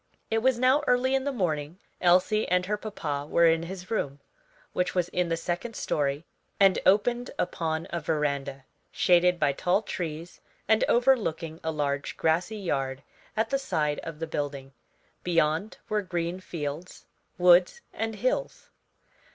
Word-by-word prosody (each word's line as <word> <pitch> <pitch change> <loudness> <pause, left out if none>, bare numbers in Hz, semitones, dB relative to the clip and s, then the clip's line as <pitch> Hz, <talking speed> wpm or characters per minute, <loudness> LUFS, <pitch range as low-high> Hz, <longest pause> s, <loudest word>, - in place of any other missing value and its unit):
It 225 - +2
was 255 +1 +2
now 255 +4 +4
early 250 +1 +3
in 270 0 +1
the 285 - 0
morning, 165 - -2 0.2
Elsie 185 +5 +3
and 180 +1 +2
her 210 +2 0
papa 160 -10 -4
were 170 - +4
in 165 0 +4
his 180 +3 -8
room, 145 -10 -2 0.5
which 180 - -1
was 180 -1 +1
in 180 -1 0
the 165 - 0
second 180 +7 -4
story 145 +1 -1 0.3
and 195 -2 +5
opened 240 +5 +3
upon 160 -2 -2
a 170 - -1
veranda, 140 -4 -2 0.3
shaded 180 0 +3
by 145 -2 +3
tall 180 +8 +1
trees, 165 -3 -6 0.3
and 220 +1 +4
overlooking 215 -11 +2
a 160 - -1
large 145 -2 -2
grassy 175 +7 +1
yard 135 -8 -2 0.3
at 220 +1 0
the 275 - +2
side 150 - -1
of 165 -2 -7
the 165 - -3
building. 140 -3 -4 0.5
Beyond 165 +3 +1
were 210 0 0
green 175 -1 -3
fields, 165 -1 -6 0.3
woods, 180 - +5
and 225 0 -3
hills. 255 - -2
175 Hz, 150 wpm, -27 LUFS, 155-210 Hz, 0.5 s, and